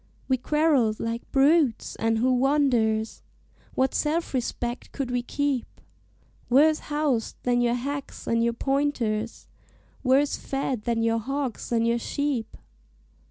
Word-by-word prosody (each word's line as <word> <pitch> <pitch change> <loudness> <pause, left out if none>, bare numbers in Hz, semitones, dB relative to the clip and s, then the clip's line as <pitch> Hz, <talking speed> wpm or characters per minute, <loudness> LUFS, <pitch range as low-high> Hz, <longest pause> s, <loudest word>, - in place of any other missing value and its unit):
"We 260 - +3
quarrelled 270 -5 +2
like 230 +1 -4
brutes, 280 -2 +3
and 225 0 +1
who 255 +3 +2
wonders? 245 -5 +1 0.5
What 265 +1 +1
self 315 +2 -1
respect 240 -1 -3
could 270 -3 -4
we 245 0 0
keep, 275 0 -1 0.8
Worse 305 +5 +5
housed 295 -6 -1
than 245 -1 +2
your 240 0 +2
hacks 280 +3 -5
and 230 0 +1
your 235 0 +1
pointers, 235 -5 -1 0.6
Worse 275 +2 +3
fed 270 -4 -3
than 230 -1 0
your 230 0 +2
hogs 270 0 -4
and 230 -1 +2
your 235 0 +1
sheep? 270 -3 -2
255 Hz, 130 wpm, -26 LUFS, 230-285 Hz, 0.8 s, Worse